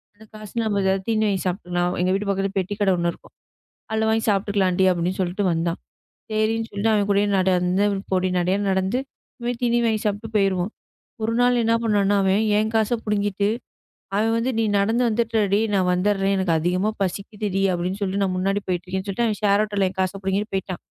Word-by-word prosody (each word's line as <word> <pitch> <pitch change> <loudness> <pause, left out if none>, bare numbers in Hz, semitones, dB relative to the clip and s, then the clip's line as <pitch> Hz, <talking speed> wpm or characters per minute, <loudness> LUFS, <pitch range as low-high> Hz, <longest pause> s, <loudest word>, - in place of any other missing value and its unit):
அந்தக் 220 +1 -18
காசு 215 -1 -10
நம்ம 210 -2 0
ஏதாவது 190 0 +1
தீனி 220 -1 +1
வாங்கி 195 -2 0
சாப்பிட்டுக்கலாம். 175 -1 -1
எங்க 185 +1 +2
வீட்டு 200 +1 -1
பக்கத்துல 195 0 0
பெட்டிக்கடை 195 +1 0
ஒண்ணு 170 0 0
இருக்கும். - - -19 0.6
அதுல 220 0 0
வாங்கி 220 0 +1
சாப்பிட்டுக்கலாம்டி 195 -2 +1
அப்டின்னு 180 +2 -2
சொல்லிட்டு 185 +2 -1
வந்தான். 165 +1 -1 0.5
சரின்னு 225 +1 0
சொல்லிட்டு 205 +2 0
அவன் 205 -1 +1
கூடயே 200 +1 +3
நடந்துப் 185 +2 +2
பொடி 185 0 +2
நடையா 185 +3 +1
நடந்து 190 +5 0 0.6
தீனி 240 0 +2
வாங்கி 220 -1 +1
சாப்பிட்டு 210 +2 -2
போயிருவோம். 195 0 +1 0.5
ஒரு 225 +1 0
நாள் 245 -1 +3
என்ன 225 0 +2
பண்ணான்னா 205 -2 +2
அவன் 190 +2 +3 0.2
என் 220 +1 0
காசை 220 +2 +2
புடுங்கிட்டு 205 -1 0 0.7
அவன் 225 +2 +2
வந்து 235 +3 0
நீ 225 - +2
நடந்து 225 +5 +1
வந்துடுடி 220 -3 +1 0.2
நான் 185 -2 +2
வந்துடறேன் 195 +1 +1
எனக்கு 185 -3 +1
அதிகமா 180 +6 0
பசிக்குதுடி 200 +1 -2
அப்டின்னு 180 +3 -2
சொல்லி 195 +1 -1
நான் 185 -2 0
முன்னாடி 195 +2 0
போயிட்டு 180 0 -2
இருக்கேன்னு 190 +1 -4
சொல்லிட்டு 235 +5 0
அவன் 215 -3 -1
ஷேர் 205 0 +4
ஆடோல 205 -2 0
என் 190 - -15
காச 185 0 +1
புடுங்கிட்டு 195 +2 -1
போயிட்டான். 190 -1 -3
200 Hz, 180 wpm, -23 LUFS, 185-215 Hz, 0.7 s, ஷேர்